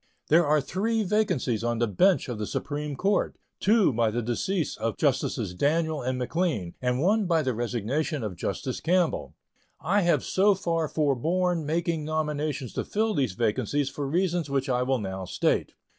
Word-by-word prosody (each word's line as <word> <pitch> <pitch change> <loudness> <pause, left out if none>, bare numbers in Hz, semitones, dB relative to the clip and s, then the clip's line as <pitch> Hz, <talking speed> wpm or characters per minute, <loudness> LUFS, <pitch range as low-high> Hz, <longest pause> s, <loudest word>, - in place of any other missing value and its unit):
There 165 +1 +5
are 150 +1 +4
three 215 +9 -1
vacancies 180 - 0
on 120 0 0
the 120 - +2
bench 180 - +3
of 120 -4 -4
the 105 - -3
Supreme 150 -1 -3
Court 200 +8 0 0.2
two 210 - +4
by 115 -1 +2
the 120 +2 -2
decease 155 - -1
of - - -3
Justices 90 - 0
Daniel 155 - +1
and 130 +1 -2
McLean 125 - -1
and 125 0 0
one 200 +6 +2
by 165 -2 +2
the 130 -2 0
resignation 120 +5 -2
of 105 -4 -4
Justice 120 +8 -3
Campbell. 165 - 0 0.4
I 200 +4 +2
have 175 -2 +2
so 200 +1 +3
far 165 -4 -1
forborne 160 +4 0
making 165 0 0
nominations 150 -4 -2
to - - -2
fill 220 +1 0
these 130 - 0
vacancies 125 +6 0
for 140 -1 -4
reasons 175 0 0
which 135 0 -1
I 125 -1 +1
will 130 +1 +1
now 95 -3 -4
state. - - 0
150 Hz, 175 wpm, -27 LUFS, 125-175 Hz, 0.4 s, There